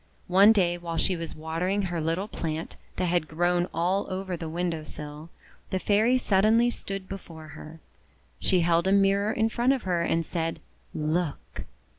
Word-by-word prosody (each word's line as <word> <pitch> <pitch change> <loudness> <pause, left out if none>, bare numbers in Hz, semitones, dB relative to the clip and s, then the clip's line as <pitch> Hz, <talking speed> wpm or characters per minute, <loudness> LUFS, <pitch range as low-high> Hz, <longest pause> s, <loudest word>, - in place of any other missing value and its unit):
One 195 +4 +6
day, 175 -5 +2
while 170 -1 -4
she 185 - +2
was 165 -1 -6
watering 165 +6 -1
her 175 -3 -2
little 165 +6 -1
plant 160 -5 -4 0.2
that 185 - -1
had 175 -2 +1
grown 175 +2 +1
all 180 +5 0
over 185 -1 -3
the 165 -1 -6
window 170 -1 -2
sill, 150 +1 -8 0.4
the 190 - 0
Fairy 215 +6 +3
suddenly 225 +2 +3
stood 195 -4 -6
before 165 -5 -9
her. 160 +2 -11 0.6
She 185 -2 +2
held 170 +1 +2
a - - +3
mirror 200 +1 +3
in 220 0 +1
front 240 +3 +2
of 265 - -3
her 175 -2 0
and 165 0 0
said: 165 -1 -3 0.2
— - - -36
"Look!" 155 0 -2
175 Hz, 175 wpm, -27 LUFS, 165-195 Hz, 0.6 s, One